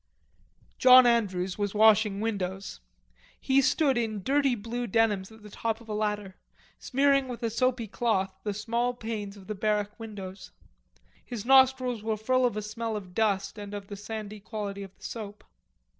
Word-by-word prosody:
John 255 0 +9
Andrews 195 -6 +1
was 205 0 -2
washing 210 -1 +4
windows. 195 -3 -3 0.6
He 270 +1 +3
stood 270 -1 +2
in 215 -4 -3
dirty 275 +1 +2
blue 235 +3 -4
denims 210 -2 +1
at 220 -1 -16
the 210 - -11
top 225 +1 -2
of 230 - -16
a 215 - -4
ladder, 210 -2 -2 0.4
smearing 275 0 +2
with 245 -1 -7
a 230 - 0
soapy 245 0 0
cloth 195 -3 0
the 210 - -1
small 235 +3 -1
panes 215 -3 -5
of 195 - -13
the 215 - -4
barrack 210 +1 -1
windows. 195 -4 -8 0.7
His 235 -3 -6
nostrils 260 -3 +4
were 220 0 -1
full 255 +4 +2
of 215 - -4
a 215 - -3
smell 225 +1 -4
of 190 -4 -7
dust 205 0 0
and 205 0 -7
of 200 -1 -8
the 205 - -6
sandy 210 0 -7
quality 200 -1 -5
of 195 -1 -10
the - - -21
soap. 210 -3 -7
215 Hz, 175 wpm, -28 LUFS, 205-240 Hz, 0.7 s, John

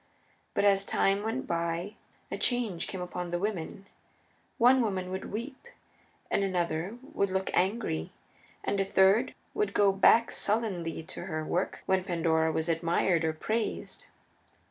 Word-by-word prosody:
But - - +2
as 195 -1 +4
time 195 0 +1
went 225 +5 -2
by 170 +3 -2 0.4
a - - -2
change 235 -9 0
came 190 - -5
upon 180 0 -4
the 175 - -1
women: 195 -1 -4 0.7
one 255 +1 +6
woman 190 -5 -2
would 190 - -5
weep, 260 - -6 0.6
and 200 - +2
another 180 +2 -1 0.2
would 200 - +1
look 190 0 -1
angry, 185 - 0 0.5
and 200 - -1
a - - +3
third 195 +5 +3 0.2
would 420 0 -1
go 200 -1 +5
back 225 +4 +5
sullenly 190 -7 -1
to - - -7
her 155 0 -3
work 180 +4 -2
when 190 -1 +2
Pandora 160 -3 +1
was 160 +1 -1
admired 170 +1 +1
or 160 -1 +1
praised. 220 +7 -3
190 Hz, 145 wpm, -29 LUFS, 170-210 Hz, 0.7 s, one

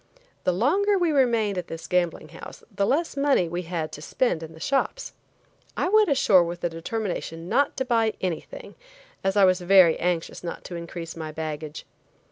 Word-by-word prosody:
The - - +3
longer 375 - +2
we 350 -3 +2
remained 230 -8 +2
at 175 - -7
this 165 0 -7
gambling 180 -2 -1
house - - -11
the 200 - +1
less 320 +4 0
money 275 -10 +2
we 175 +2 -3
had 165 -2 -4
to 150 - -9
spend 170 0 0
in 160 -1 -8
the 160 - -13
shops. 275 - -1 0.6
I - - +1
went 430 -1 +4
ashore 210 -10 +5
with 175 +1 -5
the 175 - -1
determination 170 -2 -4
not 280 +8 +1
to 265 - -1
buy 225 -3 +1
anything 190 - -5 0.5
as 195 +1 0
I 200 - +7
was 185 0 +3
very 180 -2 +5
anxious 175 -1 -2
not 170 - -6
to 175 - -7
increase 170 -1 -7
my 160 -2 -6
baggage. 155 -1 -6
185 Hz, 185 wpm, -25 LUFS, 165-265 Hz, 0.6 s, I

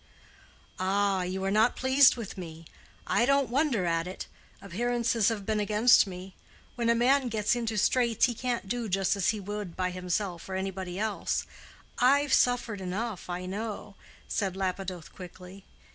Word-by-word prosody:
"Ah, 195 0 +1
you 185 +1 -3
are 195 - 0
not 220 +4 +3
pleased 260 +1 +5
with 230 -5 -7
me. 165 -3 -9 0.4
I - - +2
don't 275 0 +2
wonder 265 - +1
at 165 0 0
it. 185 - -6 0.3
Appearances 230 +2 0
have 210 -3 -4
been 215 0 0
against 210 +2 +5
me. 185 0 -8 0.4
When 235 -1 -1
a 235 - +4
man 260 +3 +3
gets 220 -1 0
into 230 -2 -2
straits 235 +1 +3
he 245 - -1
can't 240 -3 -3
do 235 +1 -3
just 195 +1 +1
as 200 - +1
he 215 - 0
would 205 -2 -6
by 185 -1 -1
himself 180 0 -3
or 190 - -3
anybody 190 -1 -4
else, 215 0 -1 0.5
I've 275 +3 +4
suffered 240 -5 +2
enough, 190 +2 -4
I 180 +1 -4
know," 205 +2 -5 0.3
said 195 -3 -2
Lapidoth, 185 -3 -4
quickly. 185 +1 -11
205 Hz, 160 wpm, -28 LUFS, 185-235 Hz, 0.5 s, pleased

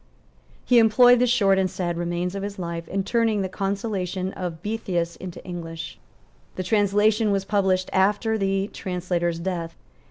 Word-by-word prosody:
He 245 -2 +5
employed 245 +2 +6
the 250 - +3
short 195 -5 +3
and 190 -1 +1
sad 175 -2 -3
remains 175 +1 -2
of 200 - -4
his 200 +1 -5
life 170 -2 -5
in 195 0 -2
turning 225 -1 +1
the - - -1
Consolation 195 -1 -3
of 175 -3 -6
Boethius 180 -6 -2
into 180 -2 -9
English. 165 -2 -7 0.6
The 185 - -3
translation 210 +2 +2
was 195 -1 0
published 190 -2 +1
after 205 +4 +2
the 195 -1 0
translator's 175 -2 -2
death. 170 -1 -4
190 Hz, 155 wpm, -24 LUFS, 175-205 Hz, 0.6 s, employed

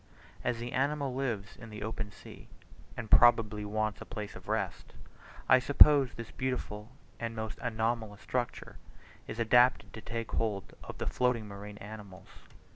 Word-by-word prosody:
As 120 -1 0
the 120 +1 -5
animal 140 0 0
lives 115 -7 -3
in 115 - -11
the 105 -1 -7
open 110 -1 -4
sea, - - -13 0.5
and 115 -3 -6
probably 110 -3 +6
wants 110 +1 -2
a - - -7
place 105 -3 -6
of - - -12
rest, - - -3 0.5
I 130 - +7
suppose 140 0 +6
this 115 -1 -8
beautiful 120 -4 -4 0.3
and 115 -1 -4
most 110 -1 -5
anomalous 110 -3 -2
structure 125 -1 -3 0.5
is 110 - -6
adapted 120 +2 +4
to 110 - -8
take 115 0 -5
hold 105 -4 -2
of - - -8
floating 125 -4 +1
marine 100 +1 -9
animals. 105 -3 -10
115 Hz, 150 wpm, -31 LUFS, 105-125 Hz, 0.5 s, I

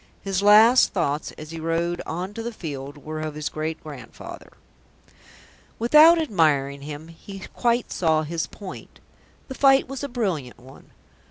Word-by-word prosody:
His 195 -1 -1
last 215 +5 +6
thoughts 145 +2 -1
as 155 0 -10
he 165 - -6
rode 165 +2 -1
on 180 +5 -4
to 230 - -6
the 235 +1 -4
field 145 - -7
were 155 0 -5
of 155 -1 -5
his 150 -1 -3
great 155 +1 -4
grandfather. 145 -5 -10 1.3
Without 305 +8 +7
admiring 150 - +1
him, 150 +2 -8
he 195 +4 -11
quite 240 0 0
saw 160 -3 +1
his 165 +2 -3
point. 195 -3 -11 0.5
The 265 - -6
fight 270 0 +4
was 270 +1 -6
a 285 - -3
brilliant 185 - -3
one. 130 +2 -16
165 Hz, 155 wpm, -24 LUFS, 155-225 Hz, 1.3 s, Without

